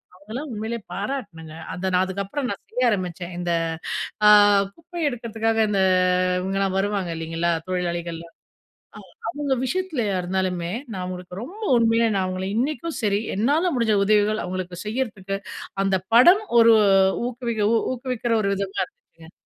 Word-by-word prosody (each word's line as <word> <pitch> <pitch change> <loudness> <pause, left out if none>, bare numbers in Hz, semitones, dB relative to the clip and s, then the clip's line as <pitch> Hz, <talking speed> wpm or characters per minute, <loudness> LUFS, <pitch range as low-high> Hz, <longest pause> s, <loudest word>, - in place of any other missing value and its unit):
அவங்களைலாம் 225 +10 -7
உண்மையிலே 220 +2 -3
பாராட்டணுங்க. 195 - -5 0.2
அத 190 +1 -2
நான் 180 +1 +4
அதுக்கப்புறம் 200 +8 -3
நான் 200 - -5
செய்ய 250 -1 +2
ஆரம்பிச்சேன். 180 -3 -3
இந்த 175 -1 -3 0.8
அ - - +9 0.5
குப்பை 345 +1 -9
எடுக்கறதுக்காக 225 -3 -1
இந்த 200 -2 +1 0.6
இவுங்கலாம் 195 0 -1
வருவாங்க. 200 -2 -1
இல்லைங்களா, 165 +1 -1 0.2
தொழிலாளிகள்லாம். 170 -2 -3 0.9
அ - - -2
அவங்க 290 -4 -1
விஷயத்துலயா 260 - -1
இருந்தாலுமே, 180 -1 -2 0.2
நான் 190 -4 -4
அவுங்களுக்கு 180 0 -6
ரொம்ப 390 - -9 0.2
உண்மையா 230 0 +3
நான் 190 -1 +1
அவுங்கள 185 0 -3
இன்னிக்கும் 305 +6 -2
சரி. 205 -1 +1 0.2
என்னால 300 - +2
முடிஞ்ச 225 -3 +2
உதவிகள் 215 +1 +2
அவுங்களுக்கு 180 -1 -5
செய்யிறதுக்கு 210 -5 -3 0.5
அந்த 195 -1 +2 0.2
படம் 350 - +7 0.2
ஒரு 230 0 +7 0.5
ஊக்குவிக்க 235 -3 -3 0.3
ஊக்குவிக்கிற 250 -2 -2
ஒரு 200 - 0
விதமா 195 0 -4
இருந்துச்சுங்க. 170 - -19
205 Hz, 135 wpm, -23 LUFS, 185-245 Hz, 0.9 s, அ